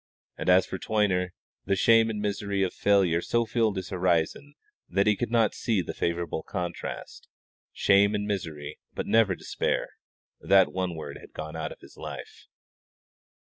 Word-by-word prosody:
And - - -2
as 90 +1 +6
for 95 - -6
Toyner, 100 -4 +1 0.4
the 100 - +2
shame 115 +3 +5
and 110 -2 -3
misery 100 -1 -1
of 95 - -1
failure 95 -5 +3
so 120 +4 +1
filled 110 -2 +1
his 95 - -4
horizon 90 - 0 0.3
that 100 +1 +2
he 105 -1 +4
could 120 - -2
not 115 -2 +3
see 110 -4 0
the - - -5
favourable 85 -2 -2
contrast 90 0 -6 0.4
shame 100 +1 +4
and 105 0 -1
misery, 80 -8 -4 0.2
but - - -3
never 110 -4 +3
despair; - - -2 0.5
that 95 -1 +4
one 90 -2 -2
word 80 - -7
had - - -15
gone 80 +1 -6
out 80 -1 -4
of - - -12
his - - -16
life. - - -9
100 Hz, 165 wpm, -27 LUFS, 90-105 Hz, 0.5 s, as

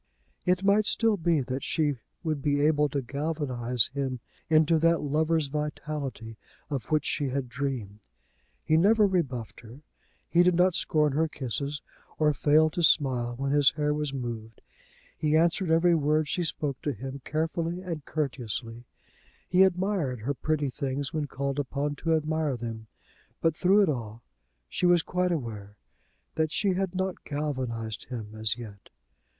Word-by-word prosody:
It 180 +1 +2
might 200 +2 +4
still 225 -2 +2
be 165 -4 +1
that 130 +1 -3
she 150 -4 0 0.3
would 155 -4 -1
be 145 0 +1
able 150 0 +3
to 140 -1 -2
galvanise 130 -4 0
him 135 -3 -2 0.3
into 160 0 +4
that 165 +1 +3
lover's 155 +2 +1
vitality, 145 -5 -4 0.3
of 135 -4 -2
which 155 -1 +1
she 145 -3 -1
had 135 0 -2
dreamed. 120 -6 -4 0.6
He 155 - +3
never 210 +5 +5
rebuffed 140 - -1
her; 120 +5 -13 0.5
he 170 - +4
did 180 0 +4
not 180 +1 +4
scorn 150 -3 +2
her 160 +3 +2
kisses, 140 +1 -4 0.3
or 150 -1 +3
fail 155 +2 +4
to 175 - -2
smile 125 -7 +3
when 135 +1 -1
his 145 -2 +5
hair 150 0 0
was 150 -1 -2
moved; 115 -4 -6 0.5
he 155 0 +2
answered 170 +2 +2
every 165 +2 +4
word 155 -1 +2
she 175 - -1
spoke 145 -4 -2
to 145 - -1
him 135 +4 -7
carefully 165 +3 -2
and 165 -5 -5
courteously; 120 -5 -3 0.6
he 180 +1 +3
admired 180 - +1
her 135 +6 -1
pretty 150 0 -1
things 140 +1 -3
when 155 -2 -1
called 140 +1 -3
upon 145 +1 -2
to 165 +2 +1
admire 155 -3 0
them. 115 -2 -6 0.5
But 165 -1 +1
through 195 +5 +4
it 195 - +2
all, 115 -4 -4 0.4
she 180 - 0
was 175 -2 +4
quite 180 0 0
aware 105 -9 -5 0.6
that 160 -1 0
she 205 +3 +2
had 190 0 -2
not 190 0 -2
galvanised 130 -7 -3
him 110 -4 -7
as 110 0 -1
yet. 105 -5 -10
150 Hz, 160 wpm, -28 LUFS, 130-165 Hz, 0.6 s, never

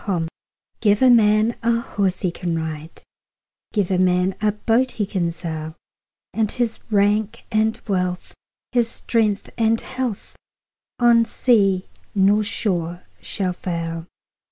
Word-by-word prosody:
Gifts 170 -5 -1 0.5
GIVE 205 0 +3
a 260 - +7
man 215 0 +4
a 230 0 +2
horse 200 -5 -1
he 180 - 0
can 170 -1 -3
ride, 160 0 -6 0.7
Give 200 -4 0
a 185 - +2
man 180 +1 +2
a 215 -1 +3
boat 230 +5 +1
he 210 - -1
can 180 -4 -1
sail; 160 -2 -6 0.6
And 220 -2 0
his 240 -2 -2
rank 205 0 +1
and 220 +1 +1
wealth, 180 -2 -2 0.4
his 240 -2 +2
strength 215 -4 -1
and 225 0 +3
health, 255 -5 -5 0.6
On 235 -1 +5
sea 200 -5 +2 0.3
nor 205 +2 +4
shore 180 -5 -2 0.2
shall 185 -3 -2
fail. 165 -2 -4
205 Hz, 130 wpm, -22 LUFS, 180-225 Hz, 0.7 s, a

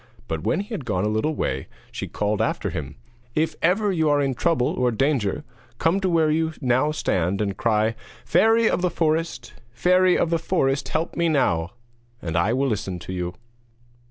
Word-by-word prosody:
But 80 -1 -3
when 170 - 0
he 205 - -9
had 195 - -4
gone 105 -6 -1
a - - +1
little 110 +9 0
way 65 - -2 0.2
she - - -5
called 105 0 -1
after - - -1
him: 75 0 -5 0.4
'If 160 +1 +1
ever 200 +4 +2
you 160 -4 +1
are 145 0 +3
in 135 -2 +1
trouble 160 -1 +1
or 125 -1 +1
danger, 120 -3 0 0.3
come 165 +8 +2
to 190 -1 0
where 160 -3 +3
you 160 +1 0
now 130 +2 +2
stand 95 - 0
and 100 -2 -1
cry: 110 0 +1 0.3
"Fairy 225 +1 +4
of 180 - +1
the 180 - +2
Forest! 160 -7 -1 0.2
Fairy 180 +7 +4
of 165 - +1
the 165 - +2
forest, 140 -5 0
help 160 +1 -2
me 170 -1 +1
now!" 90 - +1 0.5
And 80 -1 -4
I 85 +6 +2
will 135 +3 +1
listen 95 -4 -2
to 85 +2 -7
you.' 90 0 -3
135 Hz, 190 wpm, -23 LUFS, 105-165 Hz, 0.5 s, Fairy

